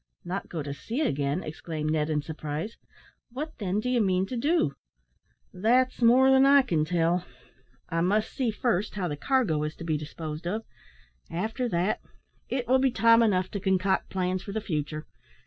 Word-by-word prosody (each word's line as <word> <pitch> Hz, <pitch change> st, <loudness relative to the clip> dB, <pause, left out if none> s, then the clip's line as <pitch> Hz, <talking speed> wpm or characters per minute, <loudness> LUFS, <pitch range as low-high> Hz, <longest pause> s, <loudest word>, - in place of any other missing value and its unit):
"Not 185 Hz, +3 st, -4 dB
go 160 Hz, -4 st, -4 dB
to 140 Hz, -1 st, -4 dB
sea 230 Hz, -, -4 dB
again!" 145 Hz, -, 0 dB
exclaimed 155 Hz, 0 st, -4 dB
Ned, 155 Hz, -1 st, 0 dB
in 150 Hz, -2 st, 0 dB
surprise. 155 Hz, +5 st, -5 dB, 0.5 s
"What, 290 Hz, +6 st, -6 dB
then, 200 Hz, -1 st, 0 dB
do 215 Hz, -, -3 dB
you 250 Hz, -2 st, +2 dB
mean 190 Hz, -2 st, +2 dB
to 250 Hz, -, -5 dB
do?" 315 Hz, +8 st, +1 dB, 0.8 s
"That's 245 Hz, +7 st, +2 dB
more 255 Hz, +3 st, +6 dB
than 265 Hz, 0 st, +6 dB
I 280 Hz, 0 st, +7 dB
can 165 Hz, -11 st, 0 dB
tell. 170 Hz, +1 st, +1 dB, 0.6 s
I 165 Hz, 0 st, -1 dB
must 210 Hz, +5 st, +1 dB
see 255 Hz, -3 st, 0 dB
first 210 Hz, -2 st, -1 dB
how 190 Hz, -3 st, -1 dB
the 150 Hz, -, -3 dB
cargo 205 Hz, -, +1 dB
is 150 Hz, 0 st, -3 dB
to -, -, -9 dB
be 160 Hz, -2 st, 0 dB
disposed 155 Hz, +2 st, -6 dB
of; 215 Hz, +5 st, -2 dB, 0.7 s
after 220 Hz, +8 st, -2 dB
that, 180 Hz, +2 st, 0 dB, 0.5 s
it 255 Hz, -3 st, -2 dB
will 260 Hz, +2 st, +4 dB
be 265 Hz, 0 st, +3 dB
time 230 Hz, 0 st, +5 dB
enough 185 Hz, -5 st, +2 dB
to 200 Hz, -, -3 dB
concoct 190 Hz, 0 st, +1 dB
plans 185 Hz, 0 st, -1 dB
for 200 Hz, -, -7 dB
the 220 Hz, -, -1 dB
future. 155 Hz, -6 st, -3 dB
190 Hz, 180 wpm, -27 LUFS, 160-235 Hz, 0.8 s, I